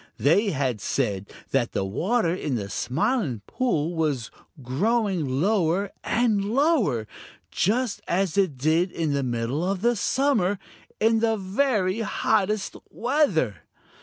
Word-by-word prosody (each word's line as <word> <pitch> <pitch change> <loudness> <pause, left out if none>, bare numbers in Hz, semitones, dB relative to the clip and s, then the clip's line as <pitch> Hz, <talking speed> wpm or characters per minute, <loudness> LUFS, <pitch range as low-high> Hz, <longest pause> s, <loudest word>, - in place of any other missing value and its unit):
They 200 +9 +3
had 130 - -1
said 100 -5 -2 0.2
that 130 -3 +1
the 95 - -1
water 175 - 0
in 150 -7 -2
the 100 -4 -4
Smiling 155 - -1
Pool 175 -11 -1
was 150 -8 -1 0.3
growing 175 - 0
lower 195 0 +1
and 220 -3 +1
lower, 230 - +2 0.5
just 225 +3 0
as 185 -2 0
it 185 -9 +1
did 160 +7 +2
in 160 -3 -1
the 140 - +1
middle 120 +4 -2
of 190 +3 -1
summer, 220 -7 +1 0.4
in 225 +1 +3
the 225 -1 +1
very 200 0 0
hottest 210 -1 0
weather. 225 - +1
185 Hz, 125 wpm, -25 LUFS, 140-220 Hz, 0.5 s, They